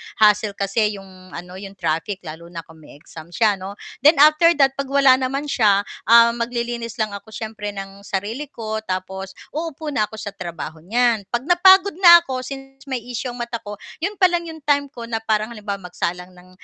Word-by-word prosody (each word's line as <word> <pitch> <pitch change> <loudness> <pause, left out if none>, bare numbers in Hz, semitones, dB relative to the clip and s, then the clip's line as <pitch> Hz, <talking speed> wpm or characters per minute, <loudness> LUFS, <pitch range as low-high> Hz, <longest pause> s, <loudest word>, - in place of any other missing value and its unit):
hassle 210 -1 +3
kasi 205 +2 0
'yong 185 -1 -13
ano 180 +2 -9
'yong 195 0 -10
traffic 170 +3 -3
lalo 160 +2 -9
na 170 -1 -8
kung 160 0 -18
may 150 - -15
exam 155 +1 -13
siya 205 +3 +1
'no. 195 +2 -7 0.2
Then 300 +5 +6
after 305 +3 +6
that, 275 -2 +4
'pag 275 - -2
wala 275 -1 +5
naman 275 +3 -3
siya, 210 -6 +3 0.3
ah, 235 0 +7
maglilinis 235 -1 -4
lang 215 - 0
ako 200 +2 -10
siyempre 215 -2 -5
ng 195 0 -8
sarili 210 +10 -3
ko 220 -5 -5
tapos 190 0 -5 0.2
uupo 315 0 -5
na 215 -7 +1
ako 220 - -11
sa 205 - -5
trabaho 170 -4 -7
niyan, 230 0 +1
'pag 240 +1 0
napagod 380 +2 +6
na 345 -2 +9
ako 260 -5 -4
since 270 +1 -10
may 260 -3 -3
issue 245 +1 -5
ang - - -10
mata 235 0 -4
ko, 205 -1 -8 0.3
'yon 380 +5 -2
pa - - +8
lang 345 -1 -1
'yong 320 -1 -9
time 285 -1 +2
ko 255 -3 -12
na 225 - -1
parang 220 -1 -1
halimbawa 205 -3 -5
magsalang 180 +1 -3
ng, 180 0 -18
220 Hz, 200 wpm, -21 LUFS, 195-270 Hz, 0.3 s, na